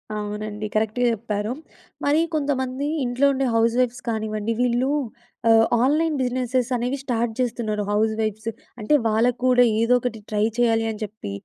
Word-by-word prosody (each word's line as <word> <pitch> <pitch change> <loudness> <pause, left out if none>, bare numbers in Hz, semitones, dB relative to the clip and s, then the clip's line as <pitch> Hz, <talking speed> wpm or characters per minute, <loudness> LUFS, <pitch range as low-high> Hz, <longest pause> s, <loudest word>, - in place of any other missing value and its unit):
అవునండి. 210 0 -4
కరెక్ట్‌‌గా 220 +3 +1
చెప్పారు. 210 -1 -3 0.5
మరి 290 +2 +3 0.2
కొంతమంది 275 -2 -1 0.2
ఇంట్లో 245 +3 +1
ఉండే 270 0 0
హౌస్ 230 0 +3
వైఫ్స్ 245 0 0
కానివ్వండి, 215 -1 -2
వీళ్ళు 250 +2 +1 0.6
ఆహ్, 225 0 +6 0.2
ఆన్‌లైన్ 305 +4 +2
బిజినెస్సె‌స్ 250 0 0
అనేవి 245 +3 -1
స్టార్ట్ 235 -3 -1
చేస్తున్నారు 230 -4 -1
హౌస్ 215 +1 +2
వైఫ్స్. 215 +1 -2 0.3
అంటే, 215 +7 0
వాళ్ళకి 230 +3 +2
కూడా 250 -1 +5 0.2
ఏదో 230 +2 +3
ఒకటి 240 -2 -4
ట్రై 210 -1 0
చేయాలి 225 -2 +2
అని 215 - -8
చెప్పి, 210 - -7
230 Hz, 145 wpm, -23 LUFS, 215-250 Hz, 0.6 s, ఆహ్